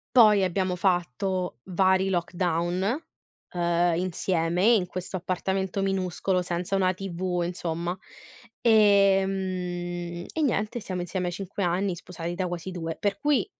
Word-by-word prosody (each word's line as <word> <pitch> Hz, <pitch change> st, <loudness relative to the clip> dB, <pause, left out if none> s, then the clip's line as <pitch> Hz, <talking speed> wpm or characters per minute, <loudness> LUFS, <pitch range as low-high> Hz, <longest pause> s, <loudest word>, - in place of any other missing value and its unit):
Poi 210 Hz, -5 st, +7 dB
abbiamo 185 Hz, 0 st, -1 dB
fatto 180 Hz, -3 st, 0 dB
vari 190 Hz, +1 st, +2 dB
lockdown, 180 Hz, -, 0 dB, 0.5 s
uhm, 175 Hz, -1 st, +2 dB
insieme 175 Hz, -1 st, 0 dB
in 220 Hz, -4 st, +5 dB
questo 185 Hz, +1 st, -5 dB
appartamento 190 Hz, +2 st, -2 dB
minuscolo, 190 Hz, -1 st, 0 dB
senza 180 Hz, +2 st, -2 dB
una 185 Hz, -1 st, +2 dB
TV 180 Hz, -1 st, -3 dB
insomma. 170 Hz, 0 st, -3 dB, 0.6 s
Ehm, 190 Hz, -5 st, +2 dB
e 320 Hz, -, -1 dB
niente, 235 Hz, -4 st, 0 dB
siamo 185 Hz, -4 st, -4 dB
insieme 180 Hz, +1 st, -2 dB
a -, -, -1 dB
5 195 Hz, +2 st, -4 dB
anni 180 Hz, +1 st, 0 dB
sposati 170 Hz, -1 st, -6 dB
da 180 Hz, +1 st, -2 dB
quasi 175 Hz, +1 st, -5 dB
2. 165 Hz, -2 st, -4 dB
Per 200 Hz, -1 st, -1 dB
cui 295 Hz, -2 st, +2 dB
185 Hz, 130 wpm, -26 LUFS, 175-195 Hz, 0.6 s, Poi